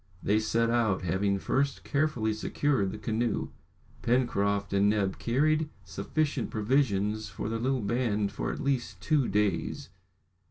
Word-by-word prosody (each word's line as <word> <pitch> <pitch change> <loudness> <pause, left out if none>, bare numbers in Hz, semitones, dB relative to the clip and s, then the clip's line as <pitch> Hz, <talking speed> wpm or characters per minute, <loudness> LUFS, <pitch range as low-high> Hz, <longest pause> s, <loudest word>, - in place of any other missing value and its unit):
They 105 +2 +3
set 115 +2 +1
out, 110 -6 +1
having 100 +3 +1
first 135 +7 0
carefully 140 -7 0
secured 110 -2 0
the - - -6
canoe. 115 0 -1 0.5
Pencroft 100 -5 +1
and 100 +1 +4
Neb 100 -3 0
carried 150 +5 +2
sufficient 125 - -2
provisions 110 -3 +1
for - - -5
the 115 0 -2
little 130 +1 0
band 105 -3 0
for - - -3
at - - -6
least 125 -8 -1
two 150 - +2
days. 100 -3 0
110 Hz, 135 wpm, -29 LUFS, 100-130 Hz, 0.5 s, and